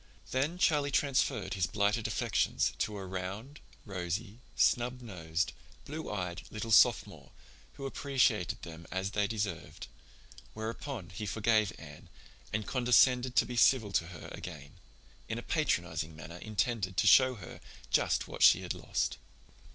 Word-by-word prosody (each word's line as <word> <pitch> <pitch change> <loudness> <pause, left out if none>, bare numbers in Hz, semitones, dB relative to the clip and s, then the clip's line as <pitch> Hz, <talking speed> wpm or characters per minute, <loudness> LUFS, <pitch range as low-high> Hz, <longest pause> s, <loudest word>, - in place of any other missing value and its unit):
Then 145 +7 0
Charlie 150 -6 +2
transferred 140 -2 +1
his 95 -3 0
blighted 105 +3 +1
affections 115 -1 0
to 105 -1 -1
a 95 - -6
round, 95 +10 -6 0.3
rosy, 100 +3 -4 0.2
snub 125 +1 +2
nosed, 90 -7 -3 0.3
blue 155 +2 -6
eyed, 90 -4 -3
little 110 +1 -5
Sophomore - - +4 0.4
who 135 - -8
appreciated 130 -8 0
them 80 -1 -9
as 95 +1 -2
they 105 -1 +1
deserved, 100 -6 -4 0.7
whereupon 110 - -5
he 105 +3 -5
forgave 110 0 +2
Anne 75 -2 -12 0.4
and 110 0 -2
condescended 125 0 +3
to - - +5
be 125 - -6
civil 115 -3 +4
to 85 -4 +1
her 85 -3 -9
again; 75 -5 -9 0.5
in - - -2
a - - -6
patronizing 80 0 -1
manner 80 +3 -9
intended 105 -3 -2
to - - +3
show 130 +5 +6
her 100 - -10 0.3
just - - +2
what - - -8
she - - +7
had - - -2
lost. - - -2
105 Hz, 145 wpm, -31 LUFS, 90-125 Hz, 0.7 s, she